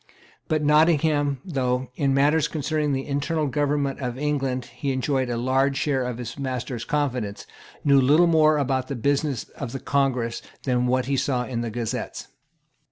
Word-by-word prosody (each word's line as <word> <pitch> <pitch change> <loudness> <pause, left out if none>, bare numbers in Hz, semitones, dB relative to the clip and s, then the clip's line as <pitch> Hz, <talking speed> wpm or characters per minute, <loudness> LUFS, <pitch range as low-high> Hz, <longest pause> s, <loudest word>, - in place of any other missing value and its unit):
But 155 -1 0
Nottingham, 150 -2 +3
though, 130 -6 -1
in 140 -1 +1
matters 145 +3 +3
concerning 150 -1 -1
the 135 0 -1
internal 150 +3 -1
government 145 -1 0
of 125 -2 -3
England, 135 -3 -1
he 135 +3 -2
enjoyed 130 0 0
a 120 - -1
large 135 +3 +1
share 135 -2 0
of 125 -2 -3
his 125 +3 -7
master's 130 -3 -3
confidence, 125 -9 -2 0.4
knew 140 -1 +5
little 150 +7 +5
more 155 -2 +4
about 130 -2 0
the 140 - -4
business 140 0 0
of 135 -4 -7
the 135 - -4
Congress 125 -5 0 0.2
than 125 -2 +1
what 130 0 +1
he 135 +1 0
saw 125 -2 0
in 120 -2 -3
the 120 - -3
Gazettes. 115 0 -4
135 Hz, 165 wpm, -24 LUFS, 125-145 Hz, 0.4 s, knew